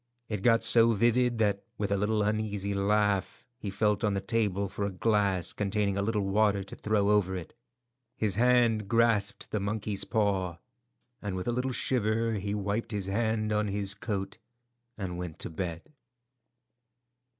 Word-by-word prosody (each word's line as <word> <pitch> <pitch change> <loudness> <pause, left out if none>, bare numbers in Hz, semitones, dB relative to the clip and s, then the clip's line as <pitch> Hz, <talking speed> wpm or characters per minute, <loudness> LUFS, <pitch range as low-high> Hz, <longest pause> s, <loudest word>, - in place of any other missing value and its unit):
It 105 -3 -3
got 115 +1 +4
so 115 0 +7
vivid 120 +2 +2
that, 105 -3 +1 0.2
with 105 -1 -2
a - - +3
little 105 +2 +1
uneasy 105 -1 -1
laugh, 100 -1 0
he 105 - -4
felt 105 +2 0
on 105 -2 +1
the - - 0
table 100 -3 -1
for 100 +2 -5
a 100 - 0
glass 100 -2 0
containing 100 -1 -1
a 100 - 0
little 105 0 0
water 100 0 +2
to 95 - -10
throw 105 -1 +1
over 95 -3 +2
it. 90 -3 -7 0.6
His 105 -3 +1
hand 115 -1 +3
grasped 115 -3 +1
the 105 - 0
monkey's 105 0 -2
paw, 100 -6 0 0.6
and 100 -2 -4
with 90 +3 -4
a - - +2
little 125 +2 -1
shiver 115 -2 0
he 100 0 -2
wiped 105 +2 -2
his 105 -4 -3
hand 110 +2 0
on 105 0 +1
his 100 -1 -1
coat 100 -1 -4 0.6
and 90 -4 -4
went 90 -3 -5
up - - -35
to - - -3
bed. 85 - -5
105 Hz, 170 wpm, -29 LUFS, 100-110 Hz, 0.6 s, so